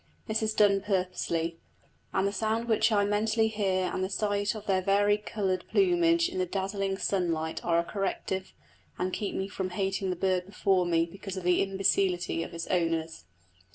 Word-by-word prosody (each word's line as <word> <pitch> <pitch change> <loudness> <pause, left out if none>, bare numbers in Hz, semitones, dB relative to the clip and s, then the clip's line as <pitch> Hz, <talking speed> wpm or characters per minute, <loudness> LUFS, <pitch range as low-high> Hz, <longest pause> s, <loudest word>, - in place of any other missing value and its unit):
This 220 0 -1
is 215 0 -1
done 200 -2 +4
purposely, 180 -4 -1 0.5
and 190 +1 +1
the - - -1
sound 220 +3 -1
which 225 0 +3
I 205 -1 +3
mentally 220 +2 +1
hear 195 -4 0
and 185 - -1
the 190 - -1
sight 205 +1 0
of 215 -1 -8
their 190 -2 +2
vari 205 +2 +3
coloured 195 -3 -2
plumage 345 -3 +3
in 370 +1 -4
the 370 - 0
dazzling 195 - -2
sunlight 165 -5 -1
are 170 -1 +2
a 170 - +3
corrective, 190 - -3 0.4
and 185 0 -2
keep 205 - -3
me 190 - -2
from 190 -2 -4
hating 195 +1 -1
the 180 - -1
bird 185 0 0
before 195 -2 +1
me 165 -1 +2
because 195 +2 -8
of 185 - -5
the 180 0 +3
imbecility 190 -3 +1
of 165 - -5
its 170 0 -5
owners. 165 - -1
195 Hz, 185 wpm, -29 LUFS, 180-210 Hz, 0.5 s, done